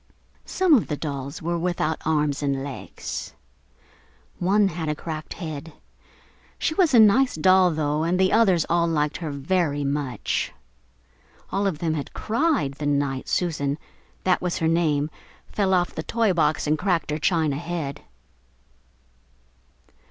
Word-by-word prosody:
Some 375 Hz, -4 st, +3 dB
of 250 Hz, -, +4 dB
the 150 Hz, -, -3 dB
dolls 140 Hz, 0 st, -5 dB
were 170 Hz, +1 st, -1 dB
without 165 Hz, -2 st, -1 dB
arms 150 Hz, -2 st, +1 dB
and 140 Hz, -2 st, -1 dB
legs. 140 Hz, -2 st, -6 dB, 1.0 s
One 195 Hz, +3 st, +3 dB
had 160 Hz, -2 st, -4 dB
a 150 Hz, -, 0 dB
cracked 155 Hz, 0 st, -6 dB
head. 160 Hz, -2 st, -6 dB, 0.8 s
She 315 Hz, -, 0 dB
was 320 Hz, -5 st, +3 dB
a -, -, +8 dB
nice 230 Hz, +5 st, +5 dB
doll, 185 Hz, +3 st, +5 dB
though, 155 Hz, -2 st, -1 dB
and 170 Hz, +3 st, +1 dB
the 190 Hz, 0 st, +3 dB
others 195 Hz, -7 st, +4 dB
all 170 Hz, 0 st, +2 dB
liked 150 Hz, -2 st, 0 dB
her 165 Hz, -3 st, -5 dB
very 145 Hz, 0 st, 0 dB
much. 140 Hz, -4 st, -2 dB, 1.0 s
All 200 Hz, +1 st, +1 dB
of 180 Hz, -6 st, -1 dB
them 160 Hz, 0 st, -1 dB
had 145 Hz, -3 st, -5 dB
cried 230 Hz, -, +1 dB
the 145 Hz, -, -2 dB
night 140 Hz, -2 st, 0 dB
Susan 145 Hz, -5 st, -1 dB, 0.5 s
(that 185 Hz, -1 st, +2 dB
was 180 Hz, -1 st, -1 dB
her 160 Hz, -, 0 dB
name) 155 Hz, -3 st, +1 dB, 0.4 s
fell 195 Hz, -2 st, +1 dB
off 180 Hz, -1 st, +2 dB
the -, -, -4 dB
toy 225 Hz, +2 st, +1 dB
box 155 Hz, -3 st, +1 dB
and 155 Hz, +1 st, +1 dB
cracked 180 Hz, -5 st, 0 dB
her 150 Hz, -, -2 dB
china 155 Hz, -4 st, +1 dB
head. 155 Hz, -4 st, -4 dB
160 Hz, 150 wpm, -24 LUFS, 150-185 Hz, 1.0 s, a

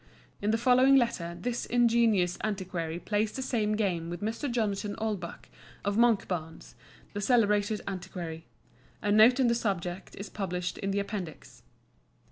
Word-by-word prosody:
In 205 Hz, -, 0 dB
the 225 Hz, -, +3 dB
following 255 Hz, +3 st, +5 dB
letter 175 Hz, -9 st, +1 dB
this 245 Hz, 0 st, -3 dB
ingenious 230 Hz, -7 st, +3 dB
antiquary 180 Hz, -6 st, -3 dB
plays 210 Hz, +3 st, -1 dB
the 265 Hz, -, -3 dB
same 215 Hz, -5 st, 0 dB
game 180 Hz, -6 st, -1 dB
with 175 Hz, 0 st, -5 dB
Mr. 225 Hz, +7 st, -2 dB
Jonathan 210 Hz, -3 st, -1 dB
Oldbuck, 205 Hz, -6 st, -4 dB, 0.4 s
of 200 Hz, 0 st, 0 dB
Monkbarns, 190 Hz, -8 st, 0 dB, 0.4 s
the 205 Hz, -, -3 dB
celebrated 210 Hz, -2 st, +2 dB
antiquary. 180 Hz, -4 st, -6 dB, 0.6 s
A 205 Hz, -, +1 dB
note 220 Hz, +5 st, +6 dB
on 260 Hz, -, +4 dB
the 235 Hz, -, +4 dB
subject 190 Hz, -5 st, -3 dB
is 200 Hz, -, -7 dB
published 180 Hz, -3 st, -3 dB
in 195 Hz, -, -2 dB
the 195 Hz, -, -1 dB
Appendix. 200 Hz, -6 st, -6 dB
205 Hz, 145 wpm, -29 LUFS, 180-230 Hz, 0.6 s, note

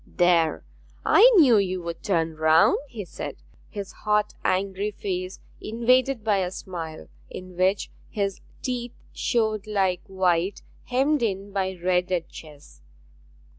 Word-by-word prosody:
'There, 175 Hz, -3 st, +2 dB, 0.4 s
I 485 Hz, +5 st, +7 dB
knew 270 Hz, -, +7 dB
you 185 Hz, -2 st, -1 dB
would 170 Hz, -1 st, -6 dB
turn 165 Hz, -4 st, 0 dB
round!' 160 Hz, +7 st, +4 dB
he 220 Hz, -7 st, -7 dB
said, -, -, -7 dB, 0.3 s
his 200 Hz, -2 st, -6 dB
hot 210 Hz, 0 st, 0 dB
angry 195 Hz, +2 st, 0 dB
face 185 Hz, -2 st, -4 dB, 0.2 s
invaded 245 Hz, +2 st, +1 dB
by 210 Hz, -2 st, +2 dB
a 185 Hz, -2 st, 0 dB
smile 170 Hz, -4 st, -7 dB, 0.2 s
in 185 Hz, -1 st, -9 dB
which 190 Hz, +2 st, +1 dB, 0.2 s
his 200 Hz, -3 st, -2 dB, 0.2 s
teeth 245 Hz, -2 st, -3 dB, 0.2 s
showed 220 Hz, -3 st, 0 dB
like 190 Hz, -4 st, 0 dB
white 185 Hz, 0 st, 0 dB, 0.2 s
hemmed 270 Hz, +3 st, +1 dB
in 200 Hz, -3 st, -2 dB
by 190 Hz, -1 st, -1 dB
red 180 Hz, +1 st, +1 dB
at 175 Hz, -3 st, -1 dB
chess. 150 Hz, -2 st, -13 dB
195 Hz, 135 wpm, -25 LUFS, 180-215 Hz, 0.4 s, I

